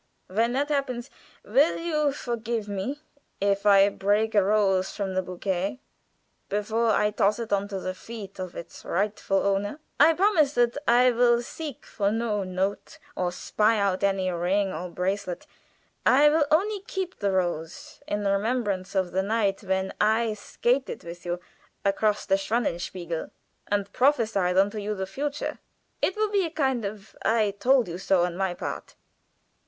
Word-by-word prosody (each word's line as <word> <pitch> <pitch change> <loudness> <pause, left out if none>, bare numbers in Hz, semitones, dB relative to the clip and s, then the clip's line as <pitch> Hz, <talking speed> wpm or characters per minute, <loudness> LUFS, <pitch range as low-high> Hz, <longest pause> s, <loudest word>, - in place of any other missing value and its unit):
When 225 +5 0
that 285 +3 0
happens, 275 -3 -2 0.3
will 275 +9 +3
you 305 -3 0
forgive 235 -4 -3
me 205 +9 -4 0.4
if 200 +1 +1
I 200 -1 +7
break 205 +3 +1
a 205 -2 +5
rose 195 -2 +2
from 195 -2 -2
the 185 - +1
bouquet 185 +4 -3 0.7
before 215 +3 0
I 210 0 +3
toss 205 0 +2
it 230 -3 -3
on 200 0 +1
to 195 -2 -4
the 185 0 -3
feet 200 -1 -9
of 185 -2 -5
its 170 - -9
rightful 195 0 0
owner? 200 +7 0 0.2
I 315 +3 +7
promise 345 -7 +3
that 240 -2 +2
I 245 +2 +6
will 240 0 +3
seek 300 +1 -7
for 200 -2 -1
no 220 -2 0
note, 190 +2 -3 0.2
nor 180 -1 -1
spy 215 +4 +1
out 200 -2 0
any 195 -2 +1
ring 185 +3 0
or 180 +3 -5
bracelet. 185 +1 -3 0.6
I 285 +3 +6
will 300 -1 +2
only 400 +7 +2
keep 375 -1 -4
the 200 -2 +1
rose 175 -4 -3
in 205 0 -2
remembrance 200 -2 0
of 185 -2 +1
the 190 - +1
night 200 -1 0
when 190 -1 -1
I 220 +1 +3
skated 245 +5 -1
with 170 +1 -9
you 175 0 -2 0.5
across 205 +1 +1
the 195 - +3
Schwanenspiegel, 180 -6 -2 0.4
and 200 -1 -1
prophesied 225 -9 +2
unto 205 +3 +3
you 210 +1 -3
the 190 -1 -3
future. 285 +9 -4 0.4
It 375 - +1
will 430 -1 0
be 400 -2 +2
a 335 - -2
kind 265 -8 0
of 200 0 -7
'I 220 -2 +2
told 255 -1 +4
you 175 +1 -5
so,' 190 -2 +2
on 175 -1 -1
my 190 -1 -1
part." - - -6
205 Hz, 165 wpm, -26 LUFS, 190-240 Hz, 0.7 s, I